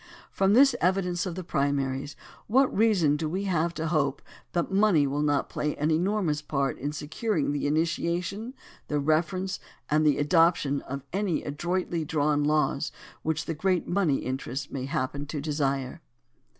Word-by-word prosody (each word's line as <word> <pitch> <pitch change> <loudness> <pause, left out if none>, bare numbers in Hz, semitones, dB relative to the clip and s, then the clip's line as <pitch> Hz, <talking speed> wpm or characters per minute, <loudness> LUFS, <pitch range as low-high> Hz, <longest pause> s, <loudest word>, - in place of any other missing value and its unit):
From 195 +1 +2
this 270 +2 +6
evidence 180 0 +1
of 175 - -4
the 185 - -5
primaries, 140 -3 -1 0.3
what 260 +4 +3
reason 185 -9 +3
have 155 -1 -1
we 190 +5 -2
to 165 -3 0
hope 145 -4 0 0.3
that 170 +2 0
money 195 -7 +4
will 140 +2 -1
not 145 -2 +1
play 150 - -2
an 150 +2 0
enormous 170 -2 +1
part 140 -3 -1
in 145 +2 -2
securing 155 - -1
the 145 0 -1
initiation, 170 - -1 0.3
the 150 - 0
reference, 165 +6 0 0.3
and 155 +1 +4
the 150 -2 +3
adoption 150 -2 +3
of 140 0 -4
any 195 -4 0
adroitly 175 +3 -2
drawn 150 -1 +1
laws 150 0 +1 0.3
which 160 0 -1
the 165 - -2
great 180 +3 0
money 175 -6 +2
interests 135 +2 -4
may 130 -2 -3
happen 140 +2 -3
to 150 0 -4
desire 140 0 -2
155 Hz, 155 wpm, -27 LUFS, 145-180 Hz, 0.3 s, this